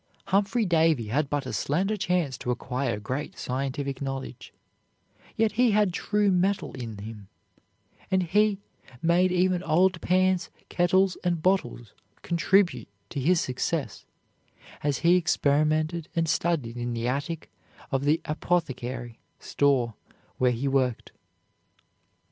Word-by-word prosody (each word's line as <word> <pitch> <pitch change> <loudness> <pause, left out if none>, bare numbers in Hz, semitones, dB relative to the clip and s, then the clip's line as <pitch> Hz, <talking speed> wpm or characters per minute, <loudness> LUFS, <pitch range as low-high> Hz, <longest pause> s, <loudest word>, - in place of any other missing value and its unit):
Humphrey 205 +4 +2
Davy 160 - +2
had 140 +5 0
but 145 -2 -1
a 130 - -5
slender 175 - 0
chance 180 -9 0
to - - -5
acquire 125 -2 -2
great 130 +8 -5
scientific 135 +1 -3
knowledge, 135 -2 -5 0.9
yet 220 -1 +3
he 240 0 +3
had 205 -3 +3
true 205 +3 +1
mettle 190 +2 0
in 115 -5 -6
him, 105 -1 -9 0.8
and 190 -1 +2
he 205 +4 +2 0.5
made 175 +2 +3
even 180 0 +2
old 180 +3 +2
pans, 185 0 +2 0.2
kettles, 185 +1 +2
and 175 -3 0
bottles 120 - 0 0.3
contribute 170 - +2 0.2
to - - -3
his 170 +6 +3
success, 130 -4 -3 0.7
as 145 -2 0
he 175 +1 +6
experimented 155 0 +1
and 165 -1 +1
studied 150 -8 0
in 120 0 -3
the 115 +1 -2
attic 145 +5 -3 0.4
of 135 0 0
the 150 +3 +2
apothecary 130 -7 -2 0.2
store 135 -5 +1 0.5
where 125 - +4
he 125 +4 -2
worked. 130 -3 0
155 Hz, 125 wpm, -26 LUFS, 130-180 Hz, 0.9 s, he